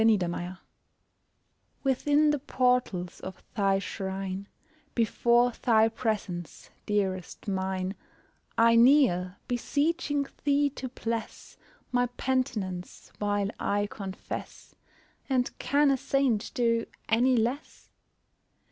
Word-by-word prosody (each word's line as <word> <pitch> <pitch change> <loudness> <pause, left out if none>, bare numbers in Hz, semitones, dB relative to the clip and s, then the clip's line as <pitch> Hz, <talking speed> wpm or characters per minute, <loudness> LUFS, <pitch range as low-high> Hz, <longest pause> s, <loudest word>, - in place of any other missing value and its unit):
CONFESSION 185 -4 +1 1.3
Within 290 +3 +3
the 295 - 0
portals 250 -10 0
of 185 -1 -8
thy 195 -3 +3
shrine 195 0 -4 0.5
Before 240 +1 +3
thy 225 -2 +4
presence, 210 -7 -4 0.2
dearest 190 -3 -2
mine, 190 -1 -1 0.6
I 230 0 +6
kneel, 230 -8 +5
beseeching 290 +3 0 0.2
thee 285 0 +3
to 260 -2 -6
bless 230 -2 -5 0.4
My 245 0 +2
penitence, 240 -8 -3
while 205 -1 0
I 205 0 +1
confess, 195 -2 -7 0.6
And 255 -2 +1
can 285 0 +3
a 270 - +2
saint 270 -5 +1
do 230 -1 +1 0.2
any 245 +3 +3
less? 245 +6 -3
230 Hz, 95 wpm, -28 LUFS, 195-260 Hz, 1.3 s, I